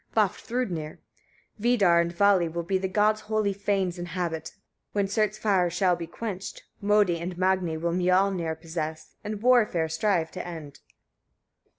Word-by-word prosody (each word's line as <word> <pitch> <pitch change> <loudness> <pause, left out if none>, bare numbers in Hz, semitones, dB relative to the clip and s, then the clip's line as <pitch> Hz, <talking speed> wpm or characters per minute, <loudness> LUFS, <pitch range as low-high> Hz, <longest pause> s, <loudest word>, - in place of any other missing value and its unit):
Vafthrûdnir. 195 -6 -1 0.6
51. - - -34
Vidar 205 -7 +4
and 170 0 -2
Vali 190 -1 +3
will 170 +1 -3
the 190 +2 0
gods' 210 +3 +2
holy 215 -2 0
fanes 195 -3 -1
inhabit, 170 -2 -4 0.4
when 200 -1 +1
Surt's 210 +1 0
fire 190 -5 +2
shall 180 +1 +2
be 170 -1 -6
quenched. 195 +1 -6 0.2
Môdi 200 -5 +3
and 175 +1 -5
Magni 185 -3 +1
will 170 +1 -1
Miöllnir 180 -2 +1
possess, 160 -1 -5
and 210 0 -5
warfare 220 -10 +4
strive 160 0 0
to - - -5
end. 160 -5 -8
185 Hz, 145 wpm, -27 LUFS, 170-205 Hz, 0.6 s, Vidar